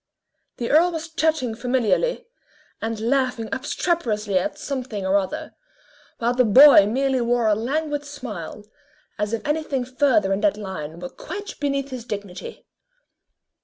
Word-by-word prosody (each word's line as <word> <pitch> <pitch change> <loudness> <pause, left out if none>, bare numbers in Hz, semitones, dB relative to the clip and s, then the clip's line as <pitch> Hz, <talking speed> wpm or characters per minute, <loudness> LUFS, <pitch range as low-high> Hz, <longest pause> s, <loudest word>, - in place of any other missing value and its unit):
The 235 - -2
earl 335 +4 +5
was 325 0 -5
chatting 315 -7 0
familiarly, 255 - 0 0.6
and 225 -1 -3
laughing 245 -1 0
obstreperously 225 - 0
at - - -3
something 250 -8 -4
or 190 +1 +2
other, 190 -2 -4 0.6
while 235 +1 0
the 250 0 +3
boy 245 -1 +8
merely 265 +3 +1
wore 240 0 +1
a 215 - +4
languid 290 +7 -2
smile, 225 - -7 0.6
as 210 0 -1
if 230 +3 -3
anything 295 -4 -1
further 250 -6 +2
in 195 - -1
that 305 -8 +2
line 170 -6 -6
were 180 0 -6
quite 405 +4 -7
beneath 275 -1 -1
his 255 -2 -5
dignity. 205 - -7
250 Hz, 140 wpm, -23 LUFS, 210-290 Hz, 0.6 s, boy